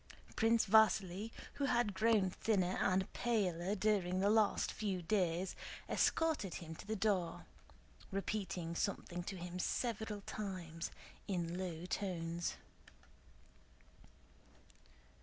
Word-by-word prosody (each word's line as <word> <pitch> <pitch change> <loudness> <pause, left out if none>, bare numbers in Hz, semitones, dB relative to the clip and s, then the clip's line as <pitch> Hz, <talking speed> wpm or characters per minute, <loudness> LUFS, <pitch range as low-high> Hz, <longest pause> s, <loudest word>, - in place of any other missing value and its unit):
Prince 225 +1 +4
Vasíli, 210 -1 +4 0.3
who - - +3
had 235 -6 +2
grown 210 -2 +3
thinner 190 -3 +1
and 190 0 +1
paler 195 -5 0
during 190 -3 +1
the 200 +2 +4
last 215 -2 +3
few 200 -4 -2
days, 180 -1 +1 0.3
escorted 310 - +1
him 160 -3 -6
to 160 - -11
the 220 - -1
door, 195 -4 0 0.6
repeating 190 -4 -2
something 175 -1 -2
to 190 +2 -5
him 180 +1 -5
several 220 -1 -1
times 180 -6 -4 0.4
in 175 -3 -1
low 180 -2 -4
tones. 175 -3 -2
190 Hz, 105 wpm, -37 LUFS, 175-215 Hz, 0.6 s, Prince